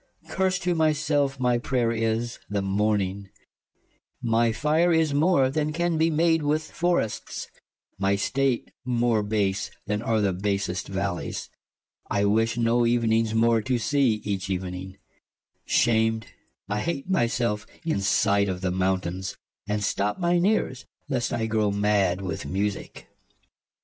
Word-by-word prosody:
Klaius. - - -12
Curse 190 -1 +1
to 175 0 +1
my 160 -2 +3
selfe 145 -2 0
my 125 -1 +2
prayer 120 -2 0
is, 115 +1 -1
the 100 -1 -1
morning: 100 -1 0 0.9
My 115 0 +2
fire 155 +9 +2
is 160 -3 +2
more, 145 -3 +3
then 150 +1 0
can 170 0 0
be 165 +1 +3
made 165 +1 +2
with 150 +1 -1
forrests; 175 -11 -1 0.5
My 100 0 +2
state 130 +5 0
more 120 -3 +1
base, 100 -2 -1 0.2
then 105 +1 -1
are 115 -1 +1
the 100 -3 +1
basest 100 -1 -2
vallies: 95 -2 -3 0.6
I 100 0 +1
wish 115 +3 +2
no 120 +1 +2
evenings 115 -2 +2
more 115 0 +3
to 125 +3 0
see, 135 +1 +2
each 100 -3 -3
evening 95 0 -4 0.4
\ - - -51
Shamed 110 -1 +2 0.4
I 105 +1 -1
have 150 +2 -3
my 185 -11 +2
selfe 110 -3 -1 0.2
in 160 -12 0
sight 100 +1 +2
of 90 0 -4
mountaines, 95 0 -1 0.3
And 105 0 -1
stoppe 105 0 0
mine 175 0 +2
eares, 130 - 0 0.2
lest 125 -4 -1
I 115 - -1
growe 110 -2 +1
mad 100 -2 +1
with 90 -4 -4
Musicke 100 +1 -3
115 Hz, 145 wpm, -25 LUFS, 100-140 Hz, 0.9 s, my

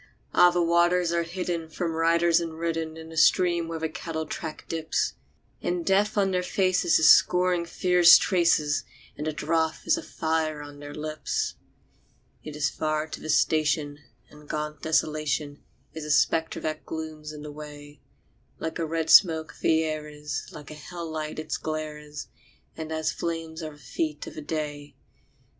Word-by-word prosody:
Ah! 180 - +7
the 175 0 +1
waters 170 +1 +3
are 170 - +2
hidden 170 -1 -3
from 165 +1 -3
riders 165 +1 +3
and 165 -1 -5
ridden 165 -1 -2
In 160 0 -10
a 160 - -9
stream 170 +1 +4
where 165 0 -4
the 160 0 -1
cattle 160 0 -5
track 160 -1 -6
dips; 160 -1 -1 0.5
And 175 -1 -2
Death 205 +2 +2
on 195 -1 +3
their 180 -1 +1
faces 185 -1 +2
is 155 - +4
scoring 180 -1 +4
fierce 180 0 +7
traces, 165 -5 +2 0.3
And 150 - -4
the - - +1
drouth 160 +1 -1
is 325 0 +3
a - - -4
fire 160 - -2
on 145 0 -11
their 145 0 -8
lips. 155 0 -2 0.9
It 150 - -7
is 150 -2 +1
far 155 +1 -1
to - - -7
the 155 - -7
station, 150 -1 +1 0.3
and 150 0 -16
gaunt 150 -1 -4
Desolation 155 -2 0 0.3
Is 160 - -6
a 150 - -6
spectre 160 +3 +2
that 155 0 -3
glooms 155 -1 -6
in 150 -1 -9
the 150 - -7
way; 145 -1 -11 0.6
Like 160 +1 -4
a 165 - -1
red 160 0 -1
smoke 160 -4 +5
the 160 0 +3
air 155 -1 -3
is, 150 0 -5
like 150 0 -10
a - - -6
hell 165 +2 -7
light 155 -1 -4
its 155 - -3
glare 155 -1 -4
is, 150 0 -8 0.5
And 160 0 -6
as 160 0 0
flame 165 -1 -4
are 155 -1 -6
the - - -16
feet 150 +3 -3
of - - -9
the 155 - -7
day. 145 -1 -5
160 Hz, 175 wpm, -26 LUFS, 150-170 Hz, 0.9 s, Ah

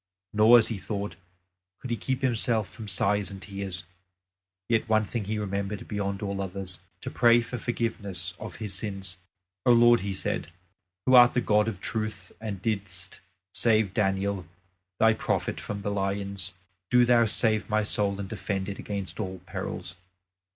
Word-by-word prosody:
Nor, 110 +3 +8
as 115 - +4
he 110 -4 -3
thought, 100 +1 -4 0.6
could 125 - -6
he - - +2
keep 130 +3 -3
himself 115 -4 +1
from 110 - -10
sighs 100 +1 +1
and 100 -1 -8
tears; 95 -3 -5 0.8
yet 115 0 +1
one 110 0 +4
thing 110 0 -3
he 110 +2 -2
remembered 100 0 -3
beyond 100 -1 -2
all 100 -1 -2
others 95 -2 -5 0.2
to - - -5
pray 120 0 +5
for 120 +1 -4
forgiveness 100 -7 -2
of 110 - -7
his 105 -3 -4
sins. 95 -2 -4 0.5
"O 125 - +5
Lord," 120 0 +7
he 100 - -3
said, 85 -3 -2 0.5
"who 130 - +3
art 125 -1 +8
the - - +4
God 105 -2 +3
of 105 -5 -3
truth, 110 -2 -4
and 100 -4 -5
didst 100 -4 -3 0.3
save 110 -4 +3
Daniel 95 -3 0 0.5
Thy 110 0 +6
prophet 110 - -1
from 100 -1 -5
the 100 - -2
lions, 100 -1 -2 0.4
do 125 0 +6
Thou 120 -1 +5
save 110 -1 +1
my 110 0 +2
soul 100 -1 +1
and 100 - -4
defend 100 -2 -3
it 100 - -6
against 100 -1 -5
all 95 -3 -3
perils!" 90 -1 -5
105 Hz, 165 wpm, -27 LUFS, 95-110 Hz, 0.8 s, Nor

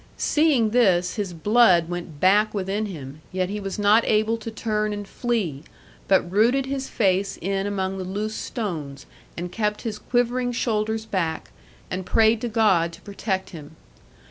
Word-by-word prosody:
Seeing 290 -8 +2
this 185 -7 +3
his 205 -4 -3
blood 180 -1 +4
went 175 -3 -6
back 210 +5 +3
within 200 +2 -1
him, 150 -5 -9
yet 185 0 -1
he 210 - -3
was 195 -1 -5
not 210 +2 +4
able 215 +1 +2
to 230 0 -7
turn 215 -1 -1
and 205 -1 -6
flee, 205 - -2 0.5
but 190 -1 +4
rooted 240 +7 +3
his 270 0 -4
face 195 -2 +1
in 195 +2 -1
among 190 -1 -2
the - - -3
loose 205 +4 -3
stones, 155 - -5 0.3
and 175 +1 -4
kept 210 0 -2
his 215 -3 -4
quivering 245 0 0
shoulders 220 -1 -1
back, 170 -7 -2 0.4
and 185 0 -3
prayed 220 +3 +3
to 240 - -2
God 200 -7 +3
to 170 - -13
protect 200 -2 -3
him. 155 -3 -11
205 Hz, 165 wpm, -24 LUFS, 185-225 Hz, 0.5 s, blood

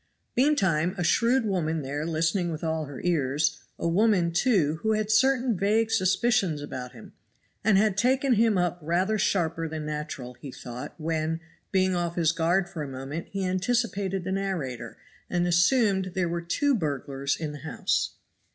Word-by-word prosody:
Meantime 190 - +2
a 175 - -1
shrewd 235 +7 +3
woman 165 -6 -1
there 145 +4 -3
listening 165 +2 0
with 160 -1 -5
all 160 -1 -1
her 140 -2 -8
ears, 145 -3 +1 0.2
a - - -2
woman, 180 -1 +3
too, 170 - +2
who 220 0 +1
had 215 0 0
certain 250 +1 +3
vague 215 +4 +1
suspicions 195 -4 +2
about 130 -3 -6
him, 115 - -13 0.5
and 215 -2 +4
had 210 -1 +3
taken 260 +5 +2
him 220 -2 +3
up 175 -1 0
rather 185 +7 0
sharper 165 -4 0
than 155 -1 -5
natural, 150 -4 -5
he 140 - -8
thought, 125 +5 -8
when, 160 0 -1 0.3
being 185 -1 +2
off 170 -1 -1
his 165 -2 +3
guard 175 +2 +1
for 175 -3 -6
a 145 - -4
moment 135 +5 -6
he 195 -1 -3
anticipated 195 -1 0
the 185 - -3
narrator, 185 -11 -3 0.3
and 175 0 +1
assumed 190 +1 +3
there 185 -2 +1
were 170 0 -2
two 280 - +1
burglars 140 - -1
in 155 -2 -3
the 150 - -8
house. 160 +3 -1
175 Hz, 170 wpm, -27 LUFS, 155-205 Hz, 0.5 s, and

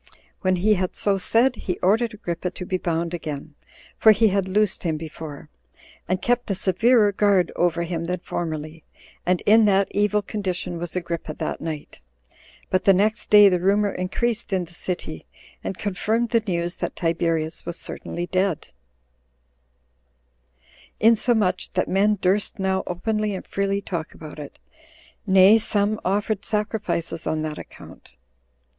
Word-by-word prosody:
When 185 -1 +1
he 205 +4 +3
had 185 -2 -2
so 200 -1 +1
said, 240 +7 +2
he 180 - -3
ordered 220 +4 +2
Agrippa 180 -3 -3
to 180 0 -8
be 185 0 -2
bound 170 0 -2
again, 155 -3 -5 0.4
[for 220 - +7
he 220 +1 +3
had 195 -1 0
loosed 205 +1 +1
him 160 -3 -1
before,] 155 -2 -8 0.6
and 185 +2 0
kept 245 -1 0
a 195 - 0
severer 210 +4 +3
guard 200 -3 +2
over 170 -1 +1
him 170 -1 -3
than 180 +1 -2
formerly, 155 -2 -5 0.4
and 180 0 +2
in 220 +1 +5
that 195 -1 +3
evil 210 0 +1
condition 185 -4 -3
was 175 0 -5
Agrippa 170 -3 -4
that - - -4
night; 155 - -6 0.7
but 185 - +1
the 195 - +6
next 215 +4 +1
day 205 -1 +9
the 180 -2 +2
rumor 200 +3 +2
increased 225 +6 -2
in 185 -2 0
the 170 - -16
city, 175 - -5 0.4
and 190 - -4
confirmed 220 +4 -1
the 230 0 +2
news 175 -1 -1
that - - -4
Tiberius 165 -1 -1
was 170 -1 -4
certainly 175 - -5
dead; 185 - -1 2.3
insomuch 220 -3 +2
that - - 0
men 205 +2 +2
durst 195 +3 0
now 190 -1 0
openly 210 +3 -1
and 185 - -7
freely 200 0 -1
talk 170 -5 -5
about 155 -1 -10
it; 145 -1 -9 0.7
nay, 190 +3 +7
some 210 0 0
offered 205 +2 -1
sacrifices 210 -6 -2
on 155 0 -1
that 155 -1 -4
account. 65 - -13
185 Hz, 150 wpm, -23 LUFS, 170-210 Hz, 2.3 s, day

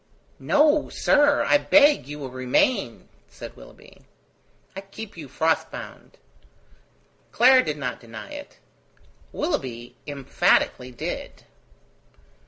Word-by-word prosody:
"No, 295 0 +2
sir, 290 0 +3
I 290 - +3
beg 290 - +4
you 145 +1 -7
will 135 -3 -7
remain," 130 - 0 0.2
said - - -11
Willoughby. - - -17 0.7
"I 195 - -6
keep 200 +2 -10
you 160 -4 -9
frost 160 +4 0
bound." - - -11 1.1
Clara 255 +2 +5
did 150 -1 -3
not 125 -4 -4
deny 115 - -11
it. 290 -1 -10 0.7
Willoughby 120 - -4
emphatically 135 -2 +1
did. 120 - -7
160 Hz, 105 wpm, -24 LUFS, -, 1.1 s, Clara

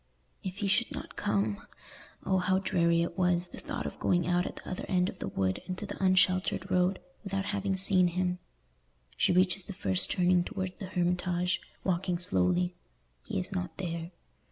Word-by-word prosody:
If 190 -1 -5
he - - +1
should 195 +2 +2
not - - -7
come! 105 0 -1 0.6
Oh, 190 -1 +2
how 185 +1 +2
dreary 170 -3 +2
it 170 - -4
was—the 180 -1 +1
thought - - -5
of - - -6
going 175 -2 +2
out 180 +1 +1
at - - -7
the - - -12
other 185 - -4
end 180 0 +2
of 190 - -10
the - - -4
wood, 95 -1 -1
into 185 +3 -4
the 200 -1 -6
unsheltered 185 0 +2
road, 180 +1 +3 0.3
without 195 -1 -2
having 200 -1 0
seen 185 -1 +6
him. 180 +1 -1 0.8
She - - +2
reaches 185 +2 +3
the 200 - -7
first 95 - +1
turning 180 -1 +3
towards 185 -2 -4
the 195 - -8
Hermitage, 180 0 0 0.2
walking 180 -1 0
slowly—he 95 - -1
is 185 +2 0
not 180 -1 -4
there. 170 -2 -4
180 Hz, 175 wpm, -30 LUFS, 175-185 Hz, 0.8 s, seen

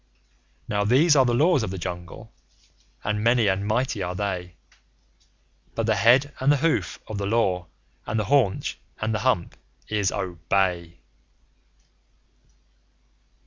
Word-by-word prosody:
Now 105 -1 0
these 140 +9 +4
are 135 -2 +5
the 120 -1 +1
Laws 155 +2 +3
of 110 - -3
the 95 - -5
Jungle, 85 -1 -7 0.7
and 105 0 -1
many 115 0 +3
and 100 0 0
mighty 110 -1 0
are 90 0 -3
they; 90 -3 -4 1.2
But 115 - -1
the 110 - +2
head 130 +7 +4
and 135 +2 +3
the 145 - +3
hoof 125 - 0
of 105 -2 -5
the 100 - -2
Law 95 -5 0 0.4
and 110 +1 -1
the 105 - -1
haunch 120 -5 +1 0.2
and 110 +1 -1
the 105 - -1
hump 105 -7 0 0.3
is 105 -3 0
Obey! 85 0 -2
105 Hz, 140 wpm, -24 LUFS, 95-120 Hz, 1.2 s, are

